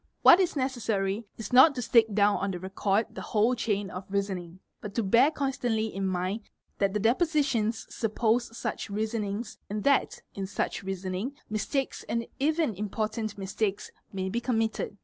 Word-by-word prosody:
What 355 - +9
is 365 -4 +1
necessary 220 -6 -1
is 225 +2 -7
not 265 +4 +8
to 250 - -2
stick 225 -1 +4
down 205 0 +4
on 200 - -1
the 180 -2 -3
record 195 +3 0
the - - -6
whole 220 +3 +2
chain 205 -5 -1
of 185 +1 -6
reasoning, 190 -3 -3 0.2
but 205 -1 -7
to 230 - +1
bear 235 +8 +5
constantly 245 -7 -1
in 195 0 -1
mind 185 +4 -1 0.4
that 200 0 +1
the - - +2
depo 225 +5 +2
sitions 240 -8 0
suppose 230 +1 0
such - - -4
reasonings 215 +1 -3
and 210 +1 -3
that, 280 -1 +2
in 195 -1 -4
such 200 - -2
reasoning, 190 +5 -3 0.2
mistakes 265 +5 -2
and 230 0 -1
even 310 -2 +1
important 215 +2 -3
mistakes 200 +1 -2 0.2
may 190 -1 -3
be 230 +5 -2
committed. 225 -4 -1
215 Hz, 170 wpm, -28 LUFS, 195-235 Hz, 0.4 s, What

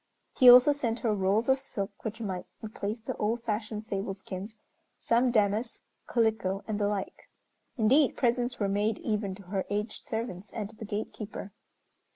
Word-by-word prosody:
He 255 -2 +8
also 250 +4 +9
sent 245 -5 -1
her 225 -3 +1
rolls 200 +3 +1
of 265 0 +4
silk, 205 -7 -6
which 220 +1 -4
might 190 -5 -4 0.2
replace 215 +1 -4
the 225 - -5
old 225 +3 -1
fashioned 215 -1 -3
sable 195 -2 -3
skins, 195 +3 -7 0.4
some 240 +2 +2
damask, 215 0 +1 0.3
calico 220 -5 +1
and 215 -1 -2
the 205 - +2
like. 205 -2 -4 0.5
Indeed, 260 +5 +4
presents 245 0 +1
were 200 - +1
made 205 +2 +1
even 205 -3 -2
to 200 - -13
her 190 +1 -2
aged 210 +2 -3
servants 220 -4 -4
and 215 -2 -4
to - - -18
the 220 - -8
gatekeeper. 210 -1 -5
215 Hz, 170 wpm, -29 LUFS, 200-235 Hz, 0.5 s, also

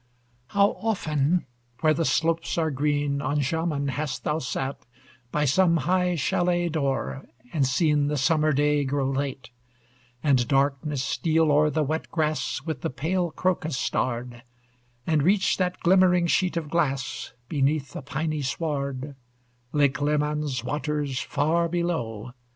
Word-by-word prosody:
How 200 +5 +3
often, 170 -6 0 0.4
where 155 -1 +4
the 165 +2 0
slopes 165 +2 +1
are 160 -2 +1
green 145 0 0
On 145 +1 0
Jaman, 145 0 -1
hast 145 +2 -3
thou 150 +1 0
sate 135 0 -4 0.5
By 150 0 +1
some 170 +4 +4
high 180 +3 +1
chalet 175 +3 +1
door, 140 -3 -2 0.3
and 140 -5 +2
seen 145 +1 +2
The 150 0 -1
summer 155 +3 +2
day 145 +1 +2
grow 135 0 0
late; 135 -3 -3 0.7
And 130 -5 +3
darkness 140 0 +1
steal 160 +1 +1
o'er 150 +1 +4
the 155 +1 0
wet 155 +3 -2
grass 155 -5 -1
With 155 -5 -4
the - - -1
pale 175 +6 -1
crocus 160 -4 -1
starr'd, 120 -2 -2 0.6
And 155 -2 +2
reach 190 +5 +3
that 180 -1 -1
glimmering 180 -1 +4
sheet 175 +1 +1
of 155 -3 -4
glass 135 -6 -1
Beneath 140 -1 0
the - - -6
piny 155 +2 -2
sward, 140 -1 -3 0.6
Lake 145 -1 +2
Leman's 150 -2 0
waters, 145 -2 -2
far 160 +4 +1
below! 160 -11 -2
150 Hz, 140 wpm, -25 LUFS, 140-165 Hz, 0.7 s, where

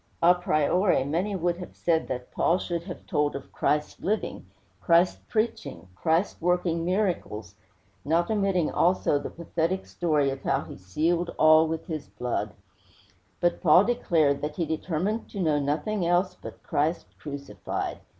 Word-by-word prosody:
A 175 +1 +8
priori, 180 -1 +2
many 175 +9 -1
would 175 -1 0
have 180 - -9
said 165 -2 +1
that 125 -1 -5
Paul 175 - +2
should 170 -2 -4
have 180 -2 -8
told 150 -1 0
of 140 - -8
Christ 150 0 -1
living, 215 +4 -2 0.3
Christ 170 +1 +3
preaching, 220 - -2
Christ 165 - 0
working 175 -1 +1
miracles, 175 - -1 0.5
not 165 +7 +1
omitting 195 -6 +1
also 175 -4 +2
the 145 - -5
pathetic 170 +2 -2
history 150 -5 0
of 135 - -6
how - - +1
he - - -9
sealed 165 - -1
all 155 +1 +6
with 160 0 -4
his 155 -5 -5
blood; 125 -1 -3 0.8
but 175 - +1
Paul 175 +2 +7
declared 165 - +2
that 150 0 -3
he 170 - -1
determined 170 +7 -2
to 200 - -7
know 155 -5 +2
nothing 150 +8 -1
else 175 +2 +2
but - - -11
Christ 155 +4 0
crucified. 140 - -5
170 Hz, 150 wpm, -27 LUFS, 150-180 Hz, 0.8 s, A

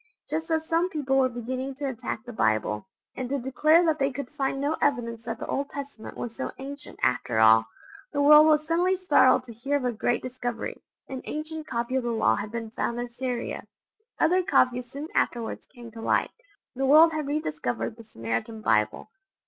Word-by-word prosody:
just 320 +1 -3
as 320 -1 0
some 335 +2 +2
people 285 -5 -1
were 265 -1 +4
beginning 255 +3 -4
to 285 +1 -5
attack 240 -3 -5
the 245 - -8
Bible, 110 - 0 0.3
and 255 -2 -4
to 280 - 0
declare 305 +6 +3
that 315 -2 +1
they 275 0 +2
could 260 -1 -6
find 270 -2 -2
no 290 +3 0
evidence 235 -5 0
that 225 -1 -3
the - - -6
Old 280 +1 -2
Testament 280 -5 -8
was 230 -1 -5
so - - -4
ancient 280 +2 -8
after 125 -2 +1
all, 110 0 +6 0.4
the 285 - -2
world 300 +2 +8
was 305 -1 +4
suddenly 350 +3 +2
startled 370 +1 +4
to 235 - -10
hear 275 +6 -2
of 265 - -4
a 250 - +1
great 235 +1 -1
discovery 245 -2 -4 0.3
an 265 -1 -6
ancient 310 +1 -5
copy 235 0 -2
of - - +1
the 240 - -1
Law 230 -1 +2
had 205 +1 -5
been 225 -1 -5
found 235 +1 -2
in 240 0 -5
Syria. 250 -1 -4 0.5
Other 360 +3 +4
copies 250 -7 +2
soon 285 +4 -6
afterwards 235 -2 -1
came 240 -3 -12
to 225 0 -9
light: - - +1 0.4
the 265 +1 -1
world 320 +4 +7
had 305 -2 -2
rediscovered 150 - -2
the 230 - -12
Samaritan 165 - -4
Bible! 110 - +1
255 Hz, 195 wpm, -26 LUFS, 230-295 Hz, 0.5 s, world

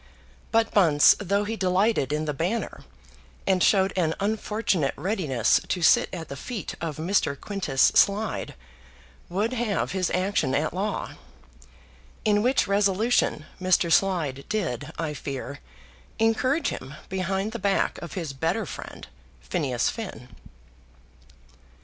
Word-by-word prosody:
But 225 0 +2
Bunce, 160 -8 +6
though 200 +1 0
he 220 +2 -3
delighted 190 - +1
in 155 +1 -1
the 150 - -2
Banner, 185 +10 -3 0.6
and 185 -1 +2
showed 195 0 +4
an 165 -4 +1
unfortunate 210 -6 0
readiness 150 - +1
to 180 - -1
sit - - +5
at 165 -4 -6
the 140 - -7
feet 210 - -5
of 160 -3 -3
Mr. 160 -4 0
Quintus 185 -11 +1
Slide, 210 +2 +2 0.7
would 205 +7 -1
have 230 -4 -1
his 185 -2 0
action 180 -8 0
at 155 +2 0
law; 200 +3 -2 1.1
in 205 -1 +3
which 255 +4 +2
resolution 200 -4 +2 0.2
Mr. 185 -2 +2
Slide 160 -9 +1
did, 155 - -2
I 160 -3 -2
fear, 140 -1 -6 0.6
encourage 255 +7 +2
him 135 +3 -7
behind 190 +2 -2
the 235 - -5
back 195 0 0
of 170 - -7
his 165 -7 -4
better 165 +10 -1
friend, - - -9 0.3
Phineas 135 -9 -1
Finn. 125 - -8
185 Hz, 130 wpm, -25 LUFS, 155-210 Hz, 1.1 s, Bunce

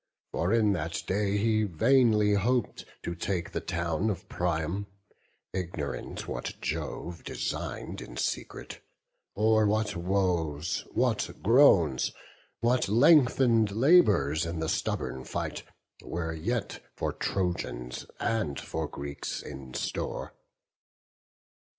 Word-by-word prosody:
For 85 +4 0
in 110 -3 +4
that 85 -1 -3
day 100 +1 +1
he 110 +1 +2
vainly 105 - +4
hop'd 115 +4 0 0.2
to 85 - -3
take 85 0 -3
The - - -3
town 85 +4 -1
of 100 0 -4
Priam; 90 +2 -1 0.7
ignorant 85 -7 -4
what - - -5
Jove 85 0 -4
Design'd - - -4
in - - -9
secret, - - -4 0.5
or 110 0 +4
what 110 +1 0
woes, 85 -4 0
what - - +1
groans, 95 - +5 0.5
What 120 -2 +2
lengthen'd 125 -3 +5
labours 100 - +4
in 85 0 -3
the 80 0 -1
stubborn 65 - -2
fight, - - -4 0.4
Were 80 -1 -3
yet 105 +7 -3
for - - -2
Trojans 75 -10 -3
and 110 -12 -1
for 80 -1 -3
Greeks 70 0 -5
in 65 -2 -9
store. - - -3
95 Hz, 110 wpm, -29 LUFS, 80-110 Hz, 0.7 s, groans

